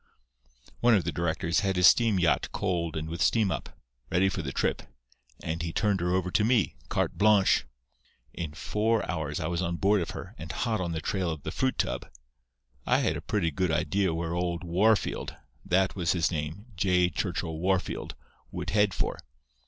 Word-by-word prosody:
"One 120 -1 +5
of 95 - +2
the 85 - -2
directors 85 +1 0
had 95 -2 0
his 90 0 +4
steam 115 0 +5
yacht 85 -6 +2
coaled 85 -3 -1
and 80 0 -4
with 80 +1 -5
steam 110 -4 +3
up, - - -5 0.3
ready 95 +2 +3
for 95 - -3
the 70 -4 -4
trip; - - 0 0.6
and 80 +1 -3
he 85 0 -3
turned 105 +1 +1
her 90 0 0
over 90 -1 -1
to 105 - +2
me, 115 -3 +2
cart - - -1
blongsh. 105 - +4 0.7
In 80 -3 -5
four 110 +6 0
hours 75 -4 -3
I 80 - -3
was 85 +1 -1
on 85 -1 -1
board 100 +3 +2
of 85 - -3
her, - - -7
and 80 0 -6
hot 110 - -1
on 85 -2 -2
the 80 - -3
trail 95 +2 -1
of 80 -3 -5
the - - -4
fruit 130 0 0
tub. - - -2 0.7
I - - +3
had - - +1
a - - -5
pretty 95 -6 0
good 90 +4 0
idea 90 +4 +1
where 85 0 -2
old 85 0 -2
Wahrfield—that 95 0 0
was 90 -3 +1
his 85 -1 +1
name, 80 +6 -4
J. 90 -1 +2
Churchill 80 -1 -3
Wahrfield—would 95 +1 -3
head 105 -2 +2
for. - - -2
90 Hz, 185 wpm, -28 LUFS, 85-100 Hz, 0.7 s, One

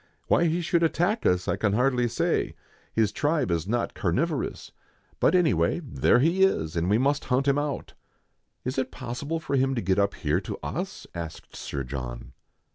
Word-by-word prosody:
" - - -42
Why 170 - +4
he 170 +2 +1
should 170 +1 +1
attack 175 +7 +1
us, 90 0 +1
I - - +1
can 105 -2 +1
hardly 125 +1 +2
say; 120 - 0 0.4
his 110 -2 +2
tribe 145 - 0
is 85 +1 -1
not 120 +2 -1
carnivorous: 140 - -1 0.5
but - - +4
any 175 -8 +4
way, 85 0 +1
there 130 - +3
he 165 +9 +2
is, 85 - +2
and 85 +2 0
we 105 - +4
must 140 +4 +1
hunt 130 +2 +1
him 140 +1 +3
out." 145 -1 -3 0.4
" - - -49
Is 130 +2 -1
it 130 -1 -1
possible 135 +7 -4
for 140 - -2
him 135 0 +2
to - - 0
get 95 0 +1
up 100 0 +1
here - - 0
to - - -5
us - - -4
?" - - -45
asked 85 -2 -7
Sir 70 -1 -4
John. 60 -1 -6
125 Hz, 200 wpm, -26 LUFS, 90-150 Hz, 0.5 s, Why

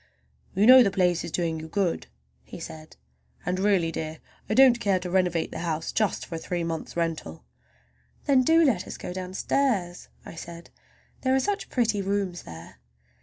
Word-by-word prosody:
"You 200 +3 +3
know 255 +2 +10
the 215 - +4
place 180 -3 +1
is - - -5
doing 165 -2 -1
you 160 - -8
good," 180 +1 -1 0.4
he - - -10
said, 155 -1 -10 0.5
"and 180 +1 -1
really, 190 -5 +2
dear, 160 0 -5 0.3
I 215 - +1
don't 255 -2 +6
care 200 -4 +2
to 180 -1 -6
renovate 180 -3 +1
the - - -6
house 165 -2 -2
just 215 -2 0
for - - -10
a - - -2
three 175 +1 -3
months' 165 0 -5
rental." 160 - -3 0.8
"Then 270 -2 +4
do 325 +5 +4
let 215 -10 +1
us - - -7
go 180 - -6
downstairs," 185 +1 -1 0.2
I - - -9
said, 170 +1 -10 0.5
"there 260 0 +2
are - - +3
such 405 +7 -2
pretty 225 -5 +1
rooms 195 -2 -2
there." 80 0 -12
180 Hz, 180 wpm, -26 LUFS, 165-215 Hz, 0.8 s, know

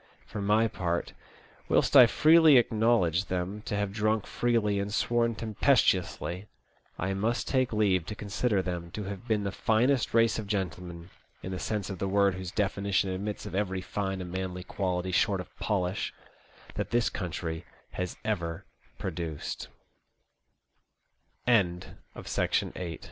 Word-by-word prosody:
For 105 - -6
my 105 +3 +3
part, 85 -4 -2 0.6
whilst - - +3
I 125 -3 +10
freely 155 +1 +6
acknowledge 110 -7 +3
them 95 +3 -3
to - - -1
have 100 -1 -1
drunk 110 0 +1
freely 115 -4 +1
and 100 +1 -3
sworn 115 +1 +1
tempestuously, 105 -5 +1 0.5
I 95 +2 -1
must 110 +5 -1
take 130 -2 +1
leave 100 -6 +2
to 105 - -5
consider 105 0 0
them 85 -2 -4
to 105 - -4
have 100 +4 -7
been 110 -3 +1
the 100 - -2
finest 120 +5 +1
race 115 -1 +4
of 105 - -6
gentlemen, 90 -3 -4 0.3
in 95 - -5
the 90 - -4
sense 105 -3 -2
of 95 - -6
the 100 - -1
word 100 0 +3
whose 95 -1 -5
definition 100 -1 0
admits 100 +3 -4
of 105 - -7
every 95 -1 -1
fine 95 0 -3
and 90 -1 -6
manly 90 -1 -4
quality 95 -1 -2
short - - +2
of - - -9
polish, 95 -2 -1 0.6
that - - -3
this 120 0 +1
country 80 -2 -4 0.3
has 90 -1 -4
100 Hz, 135 wpm, -29 LUFS, 95-110 Hz, 0.6 s, I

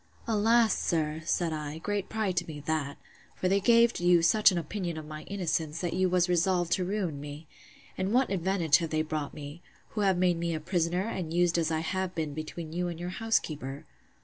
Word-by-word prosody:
Alas! 225 +1 +3
sir, 155 -1 -1
said 170 -1 0
I, 150 0 -4
great 205 +3 -3
pride 215 -4 -1
to 170 - 0
me 155 -2 -7
that! 145 -1 -2 0.4
For 185 - -1
they 195 +2 +3
gave 235 +3 +4
you 175 -1 +4
such 210 +5 +6
an 180 - -1
opinion 170 0 -3
of 155 - -6
my 155 0 -8
innocence, 165 -5 -2
that 175 -2 -2
you 185 0 +2
was 180 0 +3
resolved 175 0 +1
to 185 - +2
ruin 180 -6 -2
me. 145 +2 -8 0.5
And 190 +1 0
what 255 0 +2
advantage 180 -5 +3
have 165 -2 -3
they 155 0 0
brought 155 -2 -4
me!—Who 150 +8 -8
have 190 -3 +2
been 180 -2 +2
made 170 -1 -1
a - - -2
prisoner, 175 +2 0
and 180 -7 -4
used 175 0 +2
as 165 -1 +1
I 160 -1 0
have 185 +2 -2
been 155 -3 -2
between 155 +1 -6
you 175 +1 -1
and 170 -1 -5
your 175 +1 -4
housekeeper. 155 - -2
170 Hz, 205 wpm, -29 LUFS, 155-190 Hz, 0.5 s, such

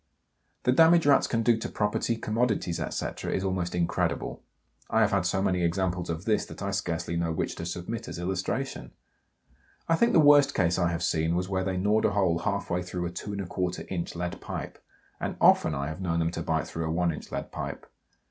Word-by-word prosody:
The 125 - +3
damage 165 +4 +6
Rats 145 -1 +5
can 115 -1 0
do 115 0 +4
to - - -4
property, 105 +2 0
commodities, 110 -6 0
etc., - - -3
is 95 - -1
almost 90 -2 -1
incredible. 85 -1 -1 0.5
I 110 - +3
have 105 -2 +3
had 95 -3 +2
so 95 +2 0
many 90 -2 +1
examples 90 +1 0
of 85 +3 -4
this 110 -2 +2
that - - -8
I 100 - -1
scarcely 85 -3 -2
know 85 -1 0
which 80 - -2
to 85 - -4
submit 100 +7 -5
as - - -6
illustration. 95 +9 -3 0.9
I 165 - +4
think 235 +7 +3
the - - +6
worst 145 -2 +6
case 90 -1 +2
I 85 -1 +2
have 85 0 -2
seen 80 0 +1
was 90 +1 -1
where 95 -1 0
they 95 -1 -1
gnawed 105 +4 +2
a - - +3
hole 90 -4 +2
half 100 -1 -2
way 90 +1 +1
through 90 0 -4
a 85 - -3
2 100 +3 -5
1/4 90 -2 -3
inch 85 -2 -3
lead 85 0 -4
pipe, - - -6 0.4
and - - -3
often - - +5
I 70 +2 -2
have 80 +4 -6
known 85 -3 0
them 85 0 +1
to 85 - -4
bite 80 -1 -1
through 80 0 -4
a - - -1
one 85 0 +1
inch - - -9
lead - - -4
pipe. - - -5
90 Hz, 215 wpm, -28 LUFS, 85-105 Hz, 0.9 s, damage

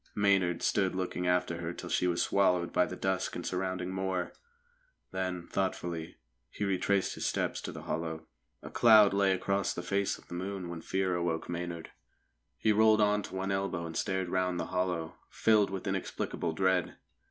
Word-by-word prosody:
Maynard 95 -4 +2
stood 95 -3 +1
looking 90 -1 -2
after 90 -1 +1
her 85 0 -4
till - - -8
she 90 - +2
was 85 -1 +1
swallowed 90 -3 +2
by 90 - +3
the 90 - -6
dusk 95 0 -1
and - - -5
surrounding 95 0 -2
moor. 95 -1 -2 0.8
Then, 90 -2 -3
thoughtfully, 85 -4 -3 0.3
he - - -5
retraced 100 0 +1
his - - -2
steps - - -1
to - - -5
the - - -9
hollow. 80 -1 -3 0.4
A - - -8
cloud 110 -4 +7
lay 100 -1 +3
across 100 +1 0
the 90 - -4
face 100 +1 0
of - - -19
the - - -9
moon 95 0 -4
when 85 -1 -6
Fear 95 +1 0
awoke 85 -2 -1
Maynard. 85 -1 -5 0.7
He 110 - +2
rolled 110 0 +5
on 105 0 +3
to 95 - -8
one 95 +1 -2
elbow 95 -3 -1
and 80 0 -7
stared 95 -1 -1
round 90 -1 0
the - - -1
hollow, 90 -3 -1
filled 110 -2 +3
with 95 0 -5
inexplicable 95 -3 -2
dread. 95 0 +1
95 Hz, 180 wpm, -31 LUFS, 85-95 Hz, 0.8 s, cloud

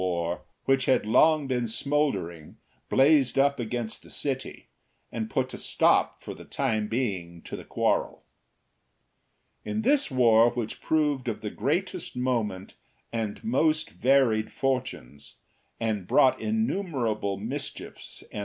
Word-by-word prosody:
2 85 -2 -1
5 - - -21 0.3
which 135 -1 +2
had 130 - +2
long 155 +7 +4
been 125 -3 -1
smouldering, 115 - -1 0.3
blazed 135 -2 +4
up 140 0 +3
against 115 -1 -4
the - - -17
city 135 -2 -4 0.5
and 110 -1 -4
put 130 -1 -1
a - - -6
stop - - +2
for - - -6
the - - -12
time 110 -6 -1
being 95 -8 -3
to - - -7
the - - -8
quarrel, - - -1 1.4
In 220 +1 -3
this 280 +3 +3
war, 120 -3 +5
which 120 -2 -5
proved 150 -5 0
of 110 -2 -3
the 105 -2 -4
greatest 175 0 -2
moment 110 -7 -2 0.4
and 110 -3 -3
most 160 -8 +1
varied 125 -5 +2
fortunes, 125 - -3 0.4
and 110 -5 -2
brought 130 - +4
innumerable 150 - -1
mischiefs 135 +8 -6
and. - - -5
125 Hz, 135 wpm, -27 LUFS, 110-140 Hz, 1.4 s, war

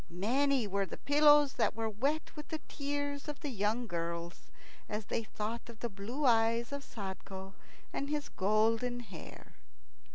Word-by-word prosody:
Many 255 +8 +2
were 200 -1 0
the - - -7
pillows 295 -1 +6
that - - +2
were 225 0 -1
wet 275 +9 -1
with 300 -1 -7
the 315 - -3
tears 285 0 -2
of 295 -1 -5
the 295 -4 -2
young 220 +2 0
girls, 170 -2 -4 0.4
as 210 0 -3
they - - -1
thought 220 +2 -4
of 230 -2 -11
the 235 - -1
blue 225 +9 -3
eyes 230 0 +4
of 280 0 -4
Sadko 190 -3 -6 0.4
and 280 - -2
his 300 -1 -1
golden 225 +5 +2
hair. 235 - -11
230 Hz, 160 wpm, -34 LUFS, 205-280 Hz, 0.4 s, pillows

